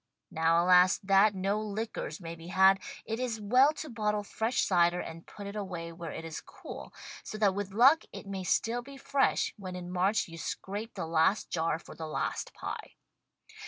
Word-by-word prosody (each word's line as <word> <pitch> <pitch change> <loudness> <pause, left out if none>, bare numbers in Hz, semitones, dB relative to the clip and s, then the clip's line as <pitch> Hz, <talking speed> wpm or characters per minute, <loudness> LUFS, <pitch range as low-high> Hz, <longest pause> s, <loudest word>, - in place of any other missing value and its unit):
Now, 165 +1 +3
alas, 180 0 +6
that 195 +1 +5
no 195 +3 0
liquors 215 +1 -4
may 165 -2 -6
be 165 0 -11
had, 190 +1 +5 0.3
it 225 +1 -3
is 240 -3 -2
well 250 +8 +5
to 310 +1 -6
bottle 210 -4 -1
fresh 225 +4 -1
cider 175 -1 +3
and 165 -1 -7
put 205 - -9
it 200 +1 -6
away 180 -5 -5
where 165 0 -7
it 165 - -6
is 160 -1 -6
cool, - - -10 0.3
so 215 - -6
that 205 -3 +3
with 200 0 -4
luck 265 +10 +6
it - - -9
may 195 -1 -4
stili 230 +6 0
be 275 +2 -11
fresh 275 0 +1
when 185 -3 -7
in 180 0 -6
March 190 +4 +1
you 165 -1 -10
scrape 205 +8 -5
the - - -3
last 165 +5 +2
jar 165 -2 0
for - - -12
the 160 - -6
last 155 - -2
pie. - - -6
195 Hz, 195 wpm, -30 LUFS, 175-215 Hz, 0.3 s, alas